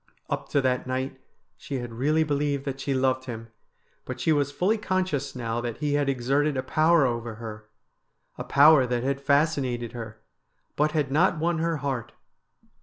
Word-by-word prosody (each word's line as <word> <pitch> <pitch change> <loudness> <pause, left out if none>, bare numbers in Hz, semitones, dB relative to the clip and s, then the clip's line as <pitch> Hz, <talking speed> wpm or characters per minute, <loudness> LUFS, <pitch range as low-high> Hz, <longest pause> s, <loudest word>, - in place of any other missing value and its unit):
Up - - -3
to 140 - +2
that 130 -1 0
night 130 +1 -3 0.4
she 140 - -6
had 120 -3 -4
really 150 +7 +2
believed 145 -2 -1
that 135 -1 -4
she 140 - -3
loved 130 0 +1
him, 115 -2 -7 0.5
but - - -6
she 160 - +1
was 145 -2 +2
fully 200 +9 +1
conscious 185 -9 -1
now 120 -1 -2
that 120 -2 -4
he 150 -1 -1
had 145 -1 +1
exerted 135 +3 +1
a 130 - -1
power 155 +2 +3
over 115 -2 -2
her 105 -1 -9 0.3
— - - -48
a - - -2
power 145 -2 +6
that 120 -1 -1
had 135 +1 -1
fascinated 140 -5 +1
her 110 -2 -8 0.3
— - - -47
but 150 +1 +1
had 145 -4 0
not 155 +3 +3
won 165 +1 0
her 165 0 0
heart. 130 -5 -3
135 Hz, 185 wpm, -26 LUFS, 120-150 Hz, 0.5 s, power